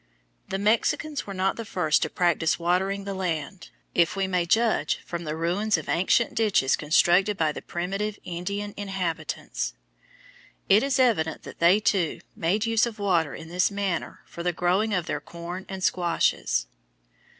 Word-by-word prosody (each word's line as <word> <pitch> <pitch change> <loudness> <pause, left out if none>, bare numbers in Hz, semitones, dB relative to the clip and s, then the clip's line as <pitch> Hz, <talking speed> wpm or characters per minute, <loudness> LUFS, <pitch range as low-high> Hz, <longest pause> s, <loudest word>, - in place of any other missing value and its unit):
The 195 - -1
Mexicans 230 +8 0
were 200 - -5
not 190 +1 0
the 230 - -4
first 175 -7 +1
to 160 - 0
practise 170 -2 +1
watering 190 +3 0
the 200 0 -4
land, 180 -1 -4 0.2
if 170 +2 +2
we 195 -1 0
may 180 -2 0
judge 225 +5 +2
from 170 -1 -5
the 155 0 -3
ruins 180 +6 +1
of - - -7
ancient 210 +8 +2
ditches 210 - +2
constructed 175 +6 +3
by 160 -3 +2
the - - -7
primitive 195 +4 -3
Indian 200 +4 -4
inhabitants. 190 - -3 0.9
It 200 +3 +6
is 275 0 +1
evident 205 -12 +2
that - - -11
they 175 +5 +5
too 190 -6 0
made 195 +7 0
use 225 0 +3
of 230 -2 -7
water 175 -7 +1
in 160 - -9
this 180 +2 +2
manner 200 -4 -3
for 170 - -9
the 180 +1 +1
growing 185 +6 +1
of 180 -5 0
their - - -3
corn 175 +2 -8
and 190 -1 -5
squashes. 175 - +1
185 Hz, 165 wpm, -26 LUFS, 170-205 Hz, 0.9 s, It